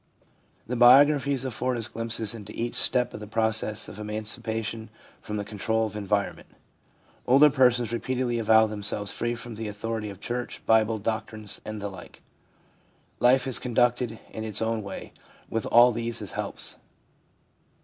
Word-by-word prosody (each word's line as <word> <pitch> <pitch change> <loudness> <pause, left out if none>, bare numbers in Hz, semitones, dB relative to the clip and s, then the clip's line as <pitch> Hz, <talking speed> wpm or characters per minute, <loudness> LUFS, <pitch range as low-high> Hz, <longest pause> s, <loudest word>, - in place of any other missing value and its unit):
The 125 - -3
biographies 135 +2 +5
afford 125 0 -2
us 115 -1 -3
glimpses 115 -2 -3
into 105 -3 -9
each 120 +1 -2
step 125 -2 +5
of - - -7
the 105 - -8
process 110 0 -1
of 105 - -10
emancipation 110 +1 -3 0.3
from 105 - -5
the 100 - -4
control 110 +2 -1
of 105 -1 -7
environ 100 -1 -1
ment. - - -16 0.8
Older 140 +4 +6
persons 125 -4 +3
repeatedly 125 0 -1
avow 110 0 +5
themselves 105 -1 -3
free 120 0 -2
from 120 0 -8
the 110 0 -5
authority 110 +1 -4
of 100 -2 -10
church, 120 +3 -5
Bible, 110 0 +3
doctrines, 110 0 -4
and 110 0 -6
the 100 - -4
like. 95 -3 -12 1.0
Life 125 +1 +4
is 130 -3 +3
conducted 120 -1 0
in 110 - -6
its 110 -2 -1
own 110 0 -1
way, 100 -1 -8 0.4
with 115 - -2
all 120 +1 +6
these 115 0 -3
as 105 -4 -5
helps. - - -6
115 Hz, 160 wpm, -26 LUFS, 105-120 Hz, 1.0 s, Older